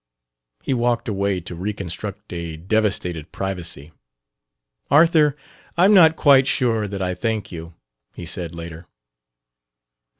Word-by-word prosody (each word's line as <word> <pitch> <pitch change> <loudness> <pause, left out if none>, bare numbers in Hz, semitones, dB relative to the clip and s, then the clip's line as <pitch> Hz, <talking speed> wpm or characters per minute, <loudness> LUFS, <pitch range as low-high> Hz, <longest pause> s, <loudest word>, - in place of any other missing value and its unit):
He - - 0
walked 120 -1 0
away 100 -3 -1
to 85 - -8
reconstruct 100 +2 -5
a 85 -2 -5
devastated 90 -4 -1
privacy. 85 -6 -4 1.0
"Arthur, 150 -1 +5 0.4
I'm 190 +4 +5
not 160 -5 +7
quite 135 -4 +5
sure 115 -5 +1
that 100 -1 -4
I 90 0 -1
thank 110 +1 -3
you," 85 -1 -9 0.4
he - - -7
said, 85 -2 -5
later. 85 0 -9
100 Hz, 120 wpm, -21 LUFS, 85-120 Hz, 1.0 s, not